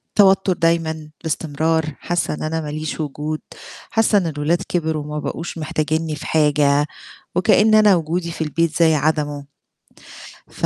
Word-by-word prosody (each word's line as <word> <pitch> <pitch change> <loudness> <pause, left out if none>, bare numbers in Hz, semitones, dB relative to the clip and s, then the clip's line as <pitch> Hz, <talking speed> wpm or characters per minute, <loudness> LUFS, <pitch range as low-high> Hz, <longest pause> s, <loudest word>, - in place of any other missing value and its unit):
توتر 195 -2 +5
دايمًا 160 -2 0
باستمرار، 160 0 0
حاسة 175 -1 -1
إن - - -6
أنا 160 +1 -2
ما 150 - -6
ليش 155 +1 -4
وجود، 150 +1 -3 0.5
حاسة 225 -1 +3
إن 185 -4 +1
الأولاد 155 +3 0
كبروا 160 -3 -1
وما 150 0 -5
بقوش 170 +3 -5
محتاجينّي 155 0 -1
في - - -9
حاجة، 145 -2 +3 0.5
وكأن 210 +4 +4
أنا 210 -3 +6
وجودي 170 +1 -2
في 165 - -7
البيت 160 +1 -1
زي 160 -2 +5
عدمه، 145 -1 -1 1.0
ف - - -4
160 Hz, 145 wpm, -20 LUFS, 150-170 Hz, 1.0 s, أنا